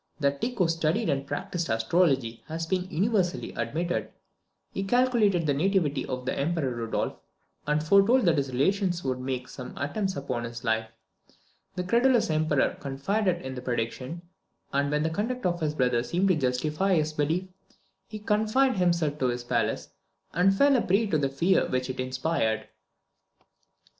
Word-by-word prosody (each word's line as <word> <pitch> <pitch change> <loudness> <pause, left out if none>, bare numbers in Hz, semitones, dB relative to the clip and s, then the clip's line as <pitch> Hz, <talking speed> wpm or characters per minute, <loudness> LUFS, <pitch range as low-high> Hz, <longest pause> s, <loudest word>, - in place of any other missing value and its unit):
That 140 -1 0
Tycho 235 -7 +1
studied 165 0 0
and 140 0 -2
practised 165 +4 -3
astrology 120 0 +1
has 165 +1 -3
been 185 +2 -1
universally 190 -1 0
admitted. 170 +3 -2 0.6
He 195 - -3
calculated 215 -6 +2
the 145 - +2
nativity 155 -2 +1
of 125 -1 -4
the - - -1
Emperor 145 -3 -1
Rudolph, 115 -1 -3 0.5
and 150 +1 +1
foretold 200 +8 +5
that 165 -3 +3
his 135 -1 -2
relations 175 +6 +1
would 130 -1 -1
make 130 -1 -3
some 125 - -9
attempts 190 +7 -2
upon 130 -4 -3
his 115 0 -7
life. 110 -1 0 0.9
The 180 - -2
credulous 235 +1 +3
Emperor 155 -2 +1
confided 175 +7 -1
in 130 0 -5
the 125 - -6
prediction, 125 +6 -3 0.5
and 140 +1 +1
when 150 +1 +1
the 160 - 0
conduct 230 +8 -2
of 175 -1 +1
his 150 -1 -1
brother 125 -4 +2
seemed 175 +11 0
to 185 - +4
justify 150 +7 +1
his 155 -1 0
belief, 155 +5 0 0.6
he 215 - -7
confined 215 +4 +2
himself 170 -5 +1
to 130 - +2
his 120 0 -2
palace, 115 -3 -1 0.4
and 195 +3 +3
fell 280 +3 +5
a 250 - +3
prey 200 +5 +2
to 165 -7 +1
the 140 -1 +1
fear 165 +8 +2
which 130 0 -1
it 130 - -10
inspired. 130 -2 -1
155 Hz, 165 wpm, -27 LUFS, 130-190 Hz, 0.9 s, foretold